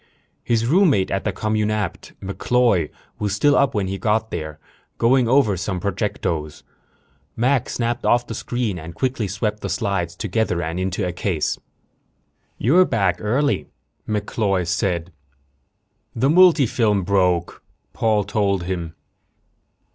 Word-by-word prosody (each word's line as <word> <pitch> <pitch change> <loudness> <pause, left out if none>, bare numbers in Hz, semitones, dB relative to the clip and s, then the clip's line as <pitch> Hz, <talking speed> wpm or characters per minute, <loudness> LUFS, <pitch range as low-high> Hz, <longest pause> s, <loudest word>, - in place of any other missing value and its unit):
His 115 -1 +1
roommate 145 - +3
at 95 - -2
the 105 - +1
communapt, 105 -1 -2
MacCloy, 100 -3 +1 0.3
was 105 -2 -1
still 145 +7 +3
up 140 -4 +2
when 100 -2 0
he 95 +1 -4
got 110 +3 0
there, 75 -3 -5 0.4
going 125 +1 +3
over 120 -5 +3
some 90 +1 -3
projectos. 85 -4 -3 0.7
Mac 125 +2 +1
snapped 120 0 -2
off 120 0 +3
the - - -6
screen 115 -5 -3
and 80 +1 -9
quickly 125 -3 -1
swept 105 +2 -2
the - - -4
slides 95 -6 -2
together 110 -2 -1
and 80 +2 -3
into 95 +1 -1
a - - -2
case. 90 -3 -1 1.0
"You're 165 - +5
back 95 - +1
early," 135 +7 0 0.4
MacCloy 105 -3 -1
said. 85 -1 -1 1.0
"The 130 +4 +2
multifilm 130 - +4
broke," 90 -3 +1 0.3
Paul 110 -2 +1
told 100 -2 0
him. 85 -3 -4
105 Hz, 130 wpm, -21 LUFS, 90-115 Hz, 1.0 s, You're